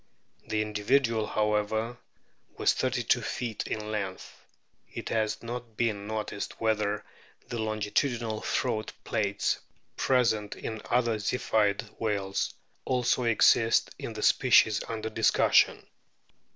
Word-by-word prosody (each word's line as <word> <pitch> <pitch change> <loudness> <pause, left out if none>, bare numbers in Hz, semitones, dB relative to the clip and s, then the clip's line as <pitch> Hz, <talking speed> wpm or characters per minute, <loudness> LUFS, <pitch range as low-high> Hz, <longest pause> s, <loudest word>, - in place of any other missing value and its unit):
That 110 - -1
individual, 110 +2 +1
however, 105 +2 0 0.6
was - - +3
thirty - - -1
two - - +2
feet 115 -3 -3
in 105 0 -4
lenoth. 100 -3 -4 0.6
It - - -6
has 110 0 -1
not 120 -2 -7
been 105 -4 -1
noticed 110 -1 -4
whether 105 -2 0 0.4
the 120 - -3
O - - 0
longitudinal 110 +1 -1
throat 110 -4 -1
plaits 100 -2 0 0.4
present 115 -5 +1
in 110 -1 -6
other 120 -2 +2
Ziphioid 105 -2 +1 0.2
whales 100 -3 -1 0.3
also 125 0 +1
exist 115 0 +4
in - - -5
the - - -5
species 110 -1 +5
under 110 0 -4
discussion. 110 +1 +3
110 Hz, 115 wpm, -28 LUFS, 105-115 Hz, 0.6 s, species